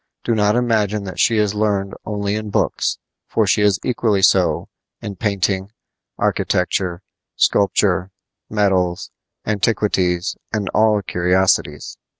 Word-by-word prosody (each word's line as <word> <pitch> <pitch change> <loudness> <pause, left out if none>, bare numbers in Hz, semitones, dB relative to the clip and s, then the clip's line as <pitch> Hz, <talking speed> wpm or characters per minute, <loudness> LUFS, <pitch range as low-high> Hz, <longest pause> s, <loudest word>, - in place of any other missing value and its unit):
Do 115 - 0
not 105 -1 +2
imagine 110 -4 +1
that 95 -2 -7
she 115 - +3
is 105 -1 +1
learned 100 -2 -1
only 100 -1 -2
in 110 0 -4
books, - - 0 0.3
for - - +1
she - - +2
is 105 -2 +3
equally 110 -5 +1
so - - +3 0.3
in 100 - -6
painting, 95 -1 -1 0.5
architecture, 90 0 -1 0.3
sculpture, 95 -2 +2 0.4
medals, 95 -4 0 0.3
antiquities, 100 -4 0 0.2
and 105 -3 -2
all 105 -1 +2
curiosities. 90 +2 0
100 Hz, 120 wpm, -19 LUFS, 95-105 Hz, 0.5 s, she